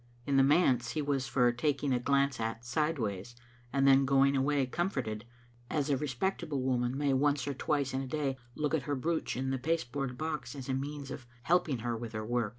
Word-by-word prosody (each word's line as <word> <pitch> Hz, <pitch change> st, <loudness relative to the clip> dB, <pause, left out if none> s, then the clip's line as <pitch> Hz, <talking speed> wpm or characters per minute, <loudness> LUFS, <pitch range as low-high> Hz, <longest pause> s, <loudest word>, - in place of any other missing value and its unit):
In 140 Hz, -, 0 dB
the 135 Hz, -, +6 dB
manse 135 Hz, -4 st, +3 dB
he 155 Hz, -, -1 dB
was 140 Hz, -2 st, 0 dB
for 125 Hz, -2 st, +3 dB
tak 140 Hz, +4 st, 0 dB
i^g 140 Hz, -2 st, 0 dB
a -, -, +1 dB
glance 140 Hz, 0 st, +1 dB
at 115 Hz, +1 st, -3 dB
sideways 120 Hz, -, -1 dB, 0.4 s
and 135 Hz, 0 st, +3 dB
then 135 Hz, 0 st, +7 dB
going 140 Hz, +1 st, +4 dB
away 140 Hz, 0 st, +2 dB
com 175 Hz, +8 st, -1 dB
forted, 110 Hz, -, -4 dB, 0.4 s
as 150 Hz, -1 st, 0 dB
a -, -, +4 dB
respectable 145 Hz, +2 st, -2 dB
woman 125 Hz, 0 st, 0 dB
may 145 Hz, -1 st, +1 dB
once 140 Hz, 0 st, +2 dB
or 140 Hz, -, -1 dB
twice 140 Hz, 0 st, -1 dB
in 135 Hz, -, 0 dB
a 135 Hz, -, -5 dB
day 140 Hz, -1 st, -1 dB, 0.2 s
look 150 Hz, 0 st, -1 dB
at 160 Hz, -, +2 dB
her 145 Hz, -, +1 dB
brooch 160 Hz, +3 st, -1 dB
in 130 Hz, +1 st, -1 dB
the 135 Hz, -, -1 dB
pasteboard 135 Hz, -3 st, -2 dB
box 155 Hz, -1 st, -4 dB
as 135 Hz, -3 st, -7 dB
a 135 Hz, -, -1 dB
means 140 Hz, +1 st, -4 dB
of 130 Hz, -2 st, -7 dB, 0.2 s
helping 170 Hz, -5 st, +2 dB
her 120 Hz, -1 st, 0 dB
with 115 Hz, 0 st, -6 dB
her 110 Hz, 0 st, -3 dB
work. 120 Hz, -1 st, 0 dB
135 Hz, 220 wpm, -31 LUFS, 125-145 Hz, 0.4 s, then